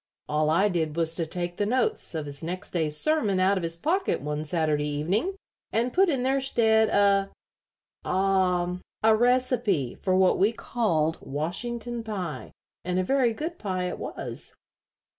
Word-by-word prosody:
All 150 +1 +1
I 170 +6 +4
did 160 -5 -1
was 165 -1 0
to 165 -1 0
take 175 +1 -4
the 205 - +1
notes 245 -6 0
of 155 -2 -2
his 140 -1 -6
next 180 +4 -5
day's 155 -3 0
sermon 225 - +2
out 190 +2 +3
of 190 - -1
his 165 0 -2
pocket 370 - 0
one 150 +1 -3
Saturday 155 -2 0
evening, 180 - -1 0.4
and 240 +2 0
put 380 0 +4
in 265 -5 0
their 270 +1 +1
stead 220 -4 +3
a 200 -1 +3 0.7
ah 185 -2 +1 0.2
a 220 0 +6
recipe 240 - +2
for 185 -1 +1
what 185 0 +4
we 205 +4 +3
called 165 -10 0
Washington 230 - -3
pie 190 -8 -5 0.3
and 180 +1 -1
a 185 - +2
very 255 +3 +2
good 320 +9 -5
pie 185 -3 -2
it 180 - -3
was." - - -4
190 Hz, 165 wpm, -26 LUFS, 165-235 Hz, 0.7 s, a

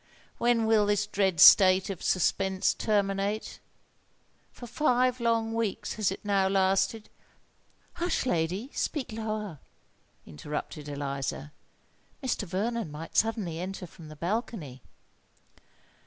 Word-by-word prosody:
when 235 -1 +2
will 220 -2 +3
this 205 0 +1
dread 195 -5 0
state 185 +2 +8
of 185 - -7
suspense 190 +1 +1
terminate? 200 0 -1 0.9
For 245 - -11
five 255 -1 +1
long 230 -1 0
weeks 225 -2 -2
has 215 -3 0
it 195 - -8
now 200 -2 +2
lasted——" 195 +3 +1 0.9
"Hush! 350 -4 -1
lady—speak 220 - -2
lower!" 215 -7 -4 0.7
interrupted 150 - -6
Eliza. 140 0 -4 0.7
"Mr. 250 -5 -1
Vernon 215 +2 -2
might 155 +2 -9
suddenly 210 -7 0
enter 185 +1 -5
from 165 -1 -13
the 155 - -10
balcony." 170 - -4
195 Hz, 110 wpm, -28 LUFS, 175-225 Hz, 0.9 s, state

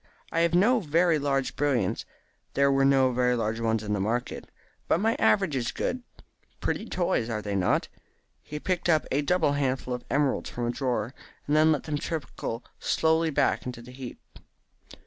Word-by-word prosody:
I 165 - 0
have 170 0 +3
no 230 +7 +4
very 165 -2 +2
large 135 -2 -1
brilliants 130 -10 0 0.5
there 140 0 +4
were 135 0 +3
no 135 -1 +4
very 125 0 +2
large 115 -1 -1
ones 110 -1 0
in 105 -1 -2
the 105 - 0
market 115 +5 -2 0.4
but - - +2
my 220 +3 +2
average 195 -8 +3
is 120 -3 -1
good. 255 - -2 0.6
Pretty 225 - -2
toys, 175 - 0
are 105 -2 -3
they 100 -1 -3
not?" 95 -2 +1 0.5
He 150 - -7
picked 175 +1 -1
up 155 -2 +3
a 140 - +2
double 160 0 +2
handful 130 -3 -1
of 125 - -5
emeralds 140 -1 +1
from 120 - -3
a 120 - 0
drawer, 125 -2 -2 0.3
and 145 - +1
then 155 +1 +5
let 150 - 0
them 150 -2 -2
trickle 125 -7 -4 0.2
slowly 160 0 +2
back 140 - +1
into 125 -2 -6
the 125 - -12
heap. 125 -1 -8
135 Hz, 185 wpm, -27 LUFS, 120-160 Hz, 0.6 s, then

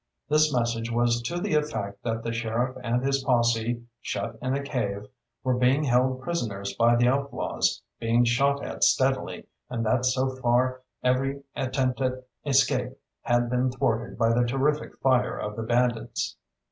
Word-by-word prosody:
This 155 +1 +4
message 115 -2 -1
was 120 0 +2
to 170 +9 -3
the 175 - -2
effect 125 -10 -1
that 115 -1 -2
the 115 - -2
sheriff 115 +2 -1
and 120 +1 0
his 135 0 +1
posse, 120 -2 +1 0.2
shut 105 +1 -3
in 130 +1 0
a 140 - -2
cave, 105 -8 -2 0.4
were 130 -1 +2
being 130 +4 +3
held 130 0 +2
prisoners 105 -12 -3
by 120 +1 +4
the 120 +1 +3
outlaws, 140 +2 0 0.2
being 115 +1 +3
shot 140 +4 +2
at - - -3
steadily, - - +2 0.2
and 115 -2 -2
that 125 +3 +2
so 130 +1 +1
far 130 +1 +1 0.2
every 135 +2 +1
attempt 130 -1 -1
at 130 -1 +1 0.3
escape 135 -2 +2 0.2
had 120 0 +1
been 125 +1 +1
thwarted 120 -1 -1
by 115 0 +3
the 120 +1 +3
terrific 140 +4 0
fire 130 -2 +2
of 105 0 -4
the 115 - -4
bandits. 120 0 0
125 Hz, 160 wpm, -26 LUFS, 115-135 Hz, 0.4 s, This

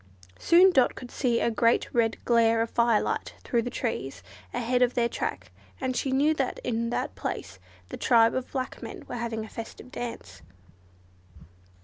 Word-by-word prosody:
Soon 360 +3 +6
Dot 265 -8 +3
could 250 -1 -9
see 240 -4 +1
a 235 - +2
great 230 +1 +2
red 225 -2 +2
glare 230 -1 +4
of 230 - -6
firelight 235 -2 +1
through 235 - +1
the 245 - -4
trees 135 - -4 0.3
ahead 250 - 0
of 250 0 +3
their 235 -1 +2
track, - - -4 0.3
and 260 -1 -2
she 265 - -1
knew 285 +4 +3
that 270 -4 -2
in 230 -1 -1
that - - -2
place 90 +1 -5 0.3
the - - -6
tribe 230 -2 +4
of 260 -1 -3
black 260 -2 -4
men - - -8
were - - -7
having 230 -2 -3
a - - -10
festive 230 +3 -9
dance. 100 - -7
235 Hz, 170 wpm, -27 LUFS, 230-255 Hz, 0.3 s, Soon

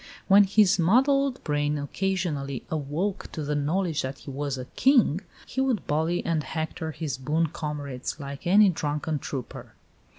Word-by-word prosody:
When 200 +1 +7
his 195 -1 +4
muddled 265 - +3
brain 145 0 0
occasionally 145 -4 -2
awoke 160 +6 -2
to 155 - -4
the 150 +1 -2
knowledge 160 +3 0
that 130 +2 -4
he 140 - -9
was 140 0 -3
a 130 - -5
King, 240 - +3 0.2
he 265 - -2
would 260 -5 0
bully 160 +4 0
and 165 -2 +1
hector 160 +2 -4
his 150 -4 -4
boon 155 +4 0
comrades 145 -4 -5
like 140 +2 -7
any 200 +2 +6
drunken 150 -2 -2
trooper. 135 -3 -7
155 Hz, 155 wpm, -26 LUFS, 145-190 Hz, 0.2 s, When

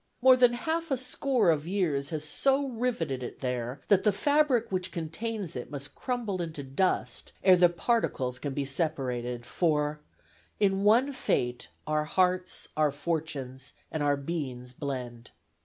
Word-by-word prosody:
More 255 0 +7
than 245 -1 +5
half 325 +7 -2
a 270 - +1
score 255 -5 +2
of 155 0 -1
years 160 -8 0
has 155 -2 -3
so 275 - +2
riveted 225 - -1
it 120 - -7
there, 125 0 -3
that 195 -2 +4
the 210 - +4
fabric 285 +1 +2
which 185 -1 -2
contains 185 +3 -4
it 125 - -5
must 140 -1 -6
crumble 235 -8 -2
into 160 -4 -5
dust 140 +8 -1
ere 185 -1 +8
the 175 0 +6
particles 170 - 0
can 140 -2 -4
be 140 - -1
separated; 125 -5 -2
for 150 -3 0 0.6
In 195 -1 +2
one 240 +7 +4
fate, 125 - -1 0.2
our 155 0 0
hearts, 185 +2 0
our 155 -1 +3
fortunes, 140 -4 -4 0.2
And 155 - -2
our 145 -1 +2
beings 135 -5 -4
blend. 125 -4 -5
160 Hz, 155 wpm, -29 LUFS, 140-215 Hz, 0.6 s, ere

